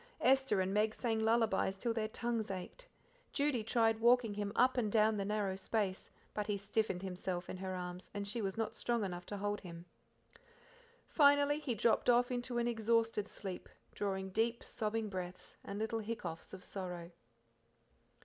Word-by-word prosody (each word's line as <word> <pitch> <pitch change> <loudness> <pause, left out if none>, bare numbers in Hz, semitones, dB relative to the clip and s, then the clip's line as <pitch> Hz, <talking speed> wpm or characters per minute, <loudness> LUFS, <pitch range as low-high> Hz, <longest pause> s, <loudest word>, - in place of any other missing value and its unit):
Esther 265 -6 +4
and 190 +1 0
Meg 215 +1 +2
sang 225 -3 0
lullabies 220 -3 +2
till 230 +3 -1
their 220 -1 -1
tongues 230 -1 -2
ached, 195 - -6 0.4
Judy 280 -6 +1
tried 225 -1 +2
walking 235 -1 +4
him 205 0 -2
up 255 +1 +4
and 225 -5 +1
down 220 0 +4
the 200 - -1
narrow 205 -2 0
space, 195 -1 -1 0.2
but 210 -1 -2
he 205 -1 0
stiffened 200 -2 -1
himself 180 -1 -3
in - - -5
her 185 0 -4
arms, 180 0 -6
and 200 0 -4
she 225 +3 -2
was 195 -1 -2
not 225 -1 -1
strong 235 -2 0
enough 175 -2 -4
to 205 - -4
hold 205 +1 -1
him. 170 -1 -9 1.2
Finally 285 0 +5
he 270 -6 -2
dropped 230 +3 +3
off 245 +1 +4
into 245 0 -2
an 240 0 +1
exhausted 225 -2 +1
sleep, 190 -3 -5 0.2
drawing 190 -1 -2
deep, 230 +4 0
sobbing 220 0 -2
breaths 185 -2 -6
and 200 - -5
little 220 +1 -1
hiccoughs 210 -7 -5
of 190 0 -9
sorrow. 180 -3 -5
215 Hz, 170 wpm, -35 LUFS, 190-235 Hz, 1.2 s, Finally